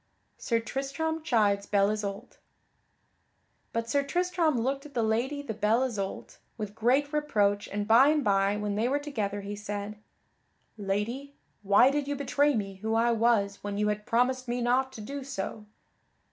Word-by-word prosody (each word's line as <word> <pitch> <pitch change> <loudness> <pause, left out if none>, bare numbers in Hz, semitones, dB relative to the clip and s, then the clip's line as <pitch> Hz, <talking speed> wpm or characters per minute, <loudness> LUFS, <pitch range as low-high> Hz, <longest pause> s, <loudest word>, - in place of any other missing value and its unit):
[Sidenote: - - -9
Sir 230 -1 +1
Tristram 320 +4 -2
chides 205 -7 +2
Belle 200 0 +3
Isoult] 210 +2 -5 1.3
But 230 0 -2
Sir 280 +4 +2
Tristram 340 -1 0
looked 270 +4 -1
at 290 - -20
the 235 - +1
Lady 245 +7 0
the 225 - -4
Belle 220 +4 +2
Isoult 210 -7 -4 0.2
with 210 -2 -5
great 260 +7 +1
reproach 205 -9 +1
and 205 0 -3
by 235 +5 +7
and 300 -1 +2
by 200 -1 +2
when 210 -1 -2
they 215 +4 0
were 280 - +2
together 215 -9 -3
he 200 +1 -5
said: 205 0 -5 0.8
"Lady, 225 +8 -3 0.3
why 205 +6 +5
did 290 0 -1
you 285 - -1
betray 285 +1 +2
me 195 -3 -3
who 220 +3 -2
I 235 +1 +3
was 220 -3 +1
when 205 0 -3
you 210 0 +1
had 210 0 -3
promised 255 +2 +1
me 240 +1 -1
not 255 +2 +1
to 225 - -8
do 275 +5 -6
so?" 215 -4 -5
230 Hz, 175 wpm, -28 LUFS, 205-275 Hz, 1.3 s, by